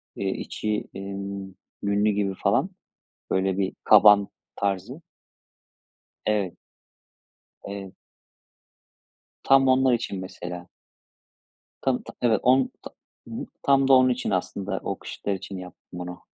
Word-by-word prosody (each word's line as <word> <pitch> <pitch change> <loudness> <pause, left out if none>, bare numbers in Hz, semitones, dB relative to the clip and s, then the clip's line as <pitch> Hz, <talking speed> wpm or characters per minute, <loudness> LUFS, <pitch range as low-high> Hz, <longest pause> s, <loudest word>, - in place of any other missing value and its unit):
iii, 95 -1 -1
içi, 105 -1 -2
emm, 100 0 -6 0.3
yünlü 100 +1 +2
gibi 100 -1 0
falan - - +3 0.6
böyle 95 0 +1
bir 95 -1 0
kaban 100 -1 +7 0.3
tarzı. 100 - -2 1.3
Evet. 105 -4 0 1.1
Evet. 100 -1 -7 1.5
Tam 135 -1 +5
onlar 130 0 +4
için 100 -5 -3
mesela. 90 -1 -7 1.2
Tam 130 -2 0
ta - - -10
Evet. 115 -4 +3
On 130 +1 +4
tam - - -9 0.4
Hı - - -12
hı. - - -4 0.2
Tam 135 -1 +4
da - - +6
onun 130 0 +7
için 125 0 -1
aslında 95 +1 -2
o - - -3
kışlıklar 100 - -4
için 95 0 -7
yaptım 90 0 -11
bunu. 90 0 -7
100 Hz, 120 wpm, -25 LUFS, 95-120 Hz, 1.5 s, kaban